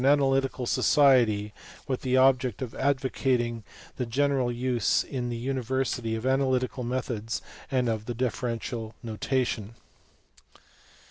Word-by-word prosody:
447 135 0 +4
Analytical 135 -1 0
Society, 115 -7 +4 0.3
with 130 -2 -2
the 130 0 +1
object 130 -3 +3
of 120 - -6
advocating 130 -4 0 0.3
the 125 - -1
general 135 0 +1
use 120 -2 +1
in 125 -3 -4
the 120 - -3
university 130 -2 -1
of 110 +2 -5
analytical 130 -1 +1
methods 120 -3 -2 0.3
and 130 -2 +1
of 110 -2 -1
the 120 - -3
diffe 125 -1 -1
rential 115 -2 -3
notation. 115 -1 -2
125 Hz, 125 wpm, -27 LUFS, 115-130 Hz, 0.3 s, 447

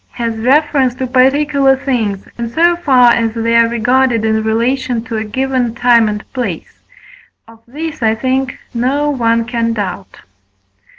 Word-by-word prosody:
has 230 -2 -4
reference 265 +1 +1
to 260 - -3
particular 270 +2 +2
things, 230 -8 -3
in 235 -1 -5
so 340 +7 +2
far 260 -8 +4
as 225 -1 -1
they 230 0 0
are 230 0 +5
regarded 240 0 +1
in 220 0 +1
relation 235 +2 -1
to 230 -1 -6
a 220 - -2
given 255 +1 -2
time 235 -2 +3
and 210 0 -5
place: 215 -11 -5 0.7
of 225 0 -17
this, 305 +3 -6
I 220 -1 +2
think, 260 +2 -2 0.2
no 275 +5 0
one 230 -3 0
can 230 -1 -1
doubt. 195 -3 -6
240 Hz, 155 wpm, -14 LUFS, 225-265 Hz, 0.7 s, are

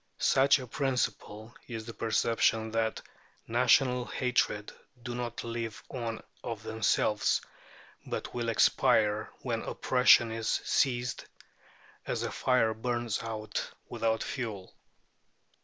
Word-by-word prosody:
Such 135 +2 +4
a 130 - -6
principle 115 -4 -2
is 115 -2 -6
the 115 - -7
perception 110 0 +1
that 110 0 -1 0.4
national 125 +1 +3
hatreds 120 -5 0 0.3
do 120 - -4
not 120 -1 -4
live 115 -2 -5
on 115 -3 -4 0.2
of 110 -2 -5
themselves, 110 -1 +1 0.7
but - - -4
will 120 -1 -2
expire 105 -1 +3
when - - -1
oppression 125 -2 +4
has 115 0 -3 0.2
ceased, 125 -2 0 0.8
as - - -1
a - - -2
fire 125 -4 +2
burns 120 0 -2
out 110 -2 -4 0.2
without 115 -1 0
fuel. 110 -9 -5
115 Hz, 110 wpm, -30 LUFS, 110-125 Hz, 0.8 s, Such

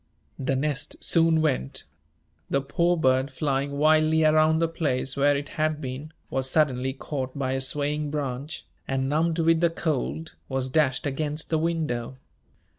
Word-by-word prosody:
The 135 0 0
nest 145 +1 -2
soon 165 -1 +4
went. 130 - 0 0.7
The 140 - +2
poor 170 +6 +1
bird, 130 -3 +2
flying 140 0 -1
wildly 155 +1 +4
around 155 0 +4
the 165 +1 +2
place 140 -5 -1
where 145 0 +3
it 145 +1 -5
had 155 -1 +1
been, 135 +3 -6 0.2
was 130 0 0
suddenly 130 -3 +2
caught 135 -1 -5
by 130 -2 -1
a 135 0 0
swaying 145 +2 -1
branch, 145 0 -4 0.2
and, 135 0 -1
numbed 160 +3 +1
with 165 0 +3
the 170 - +4
cold, 160 0 -3 0.2
was 130 -1 -1
dashed 140 -4 +2
against 150 +3 -2
the 160 - +2
window. 150 -7 -2
145 Hz, 155 wpm, -26 LUFS, 135-155 Hz, 0.7 s, soon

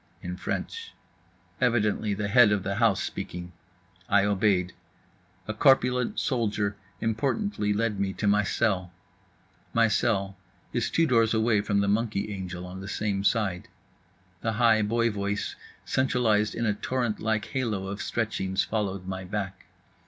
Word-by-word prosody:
In - - -4
French. 460 0 -4 0.7
Evidently 110 -4 +1
the 105 0 -2
head 115 0 +6
of 100 -2 +1
the 100 +1 -2
house 115 -4 +3
speaking. 90 0 -6 0.6
I 100 0 +4
obeyed. 95 -3 +2 0.7
A 110 - -2
corpulent 125 0 +3
soldier 105 -5 0 0.3
importantly 115 - 0
lead 105 -1 0
me 100 -1 0
to 105 - -4
my 105 0 +4
cell. 95 -5 0 0.8
My 115 0 +5
cell 100 -3 0 0.4
is - - 0
two 165 - +3
doors 115 -5 +3
away 110 -1 +3
from 100 -1 +1
the 100 - +1
monkey 105 -1 0
angel, 90 -2 -6
on 90 +1 -8
the 95 - -7
same 100 -1 -1
side. 100 -4 0 0.7
The 110 - -1
high 115 -1 +4
boy 115 +2 +1
voice, 100 0 -2 0.3
centralized 115 -5 +1
in 115 - -1
a 110 - +2
torrent 120 +1 -2
like 110 -1 0
halo 110 -8 -2
of 100 +2 -5
stretchings, 95 -4 -1
followed 100 -4 -2
my 95 0 -4
back. 95 0 -5
105 Hz, 145 wpm, -27 LUFS, 100-115 Hz, 0.8 s, head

